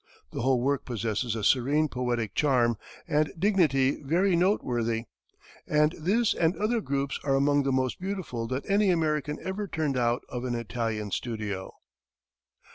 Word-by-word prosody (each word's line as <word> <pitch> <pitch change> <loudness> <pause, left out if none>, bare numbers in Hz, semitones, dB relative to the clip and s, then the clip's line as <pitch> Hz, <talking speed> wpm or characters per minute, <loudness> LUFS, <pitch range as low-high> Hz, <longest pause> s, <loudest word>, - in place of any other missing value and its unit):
The - - -4
whole 130 0 +2
work 140 +2 0
possesses 115 -1 -2
a 110 - -4
serene 140 +8 +3
poetic 120 -5 -2
charm 125 -5 +2 0.3
and 150 0 +1
dignity 160 -9 +2
very 175 +6 +2
noteworthy; 120 - +1 0.6
and 150 0 +3
this 200 +8 +1
and 170 +2 +1
other 220 +2 0
groups 140 -4 -2
are 135 -1 +2
among 145 +1 +3
the 135 -1 0
most 130 -1 0
beautiful 180 -12 -4
that 130 +3 -4
any 200 0 +3
American 150 -4 0
ever 200 +2 -3
turned 155 -7 -1
out 120 0 +1
of 125 0 -5
an 125 -1 -2
Italian 115 -3 -3
studio. 105 -5 -4
135 Hz, 150 wpm, -28 LUFS, 120-165 Hz, 0.6 s, serene